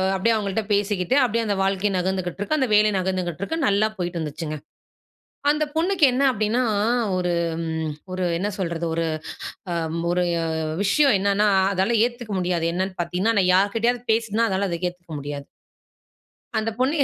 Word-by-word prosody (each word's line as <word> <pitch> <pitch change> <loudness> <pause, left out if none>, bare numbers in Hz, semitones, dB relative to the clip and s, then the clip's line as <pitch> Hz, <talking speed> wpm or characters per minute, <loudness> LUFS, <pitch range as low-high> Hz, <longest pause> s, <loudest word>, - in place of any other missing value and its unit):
அப்படியே 225 +4 +2
அவங்கள்ட்ட 210 0 -1
பேசிக்கிட்டு, 200 +2 +1
அப்படியே 230 -1 +1
அந்த 200 - +1
வாழ்க்கை 195 +1 +1
நகர்ந்துகிட்டிருக்கு. 190 - -1
அந்த 260 -4 +1
வேலை 210 0 +5
நகர்ந்துகிட்டிருக்கு. 185 - -2
நல்லா 205 +2 +3
போயிட்டு 175 -1 -3
இருந்துச்சுங்க. 155 0 -4 0.9
அந்த 305 +1 +2
பொண்ணுக்கு 345 +1 +2
என்ன 255 - +1
அப்படீன்னா, 215 +4 0 0.5
ஒரு 180 -1 0 0.3
ம் 160 -1 -2 0.2
ஒரு 185 0 -2
என்ன 200 - -1
சொல்றது? 170 -2 -2
ஒரு 165 - 0 0.7
அம் 165 0 -2
ஒரு 180 0 +1 0.6
விஷயம் 275 +4 +4
என்னன்னா, 200 +2 +2 0.2
அதால 195 +5 +1
ஏத்துக்க 240 -3 -7
முடியாது. 175 -2 0
என்னன்னு 185 +1 -2
பார்த்த்தீங்கன்னா, 185 +6 0
நான் 180 0 +3
யார்க்கிட்டயாவது 225 +5 +2
பேசினா, 225 0 +1
அதால 190 +1 0
அத 170 - -2
ஏத்துக்க 175 -2 -12
முடியாது. 145 0 -6 1.1
அந்த 220 +1 -1
பொண்ணு. 285 +5 +2
195 Hz, 145 wpm, -23 LUFS, 175-225 Hz, 1.1 s, வேலை